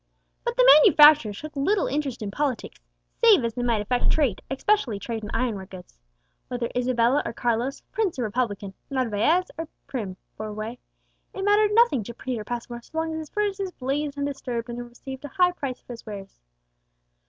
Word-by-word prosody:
But 475 0 -2
the - - +6
manufacturer 295 -6 +7
took 300 +10 -9
little 375 +9 +1
interest 275 -5 -2
in 200 - -4
politics, 275 +1 -3 0.4
save 420 - +7
as 230 - -2
they 245 - -4
might 230 -4 +1
affect 245 +4 +1
trade, 270 -11 +1
especially 270 - +1
trade 220 +2 -5
in 210 - -5
ironware 220 -6 -2
goods. 180 - -13 0.5
Whether 245 -2 -3
Isabella 250 +2 +2
or - - -4
Carlos, 240 +3 -1
prince 420 -8 -1
or 250 - -1
republican, 210 -3 -2 0.2
Narvaez 265 - +1
or 325 - -3 0.2
Prim 205 -8 -5 0.2
bore 215 -1 -5
sway, 220 +3 -5 0.6
it 385 - -4
mattered 415 0 +4
nothing 460 - +4
to 235 - -8
Peter 245 -5 -4
Passmore, 240 +1 -5
so 315 - -11
long 320 0 -1
as 315 - -3
his 310 -2 -8
furnaces 400 -2 -2
blazed 280 +2 -2
undisturbed, 265 -4 -3
and 240 0 -5
he - - -3
received 260 +3 -9
a - - -5
high 360 +1 +3
price 275 -7 -5
for 245 - -10
his 230 - -11
wares. 200 -3 -9
255 Hz, 185 wpm, -25 LUFS, 230-310 Hz, 0.6 s, manufacturer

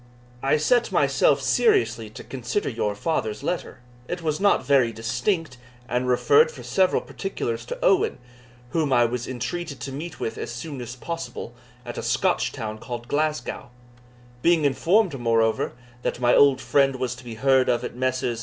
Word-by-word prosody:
I 135 +3 +3
set 240 +11 +2
myself - - +3
seriously 390 - +2
to 110 - -10
consider 130 - -3
your 105 -4 -2
father's 110 -4 -2
letter. 170 -5 -3 0.3
It 175 -1 -4
was 155 -2 -1
not 200 -8 +3
very 130 -4 +4
distinct, 125 - -2 0.3
and 125 0 -1
referred 435 - +5
for 480 - -11
several 190 -1 +2
particulars 115 - -4
to - - -4
Owen, 195 - +3 0.5
whom 155 -4 0
I 120 -2 +5
was 120 +1 -3
entreated 140 +4 -4
to 135 - -5
meet 160 +5 -7
with 110 - -4
as - - -4
soon 135 +2 -6
as 120 0 -7
possible 125 -5 -6 0.3
at 120 - -5
a - - -3
Scotch - - +1
town 110 -1 -5
called 120 0 -7
Glasgow; 150 -4 -2 0.7
being 165 -1 +3
informed, 165 - +2
moreover, 115 -1 +1 0.3
that - - -2
my 120 -1 +3
old 140 -2 +5
friend 135 +2 +2
was 125 -1 -2
to 130 - -12
be 120 -2 -7
heard 130 +2 +3
of 120 - +1
at - - -5
Messrs. 130 -2 -1
130 Hz, 170 wpm, -24 LUFS, 120-165 Hz, 0.7 s, referred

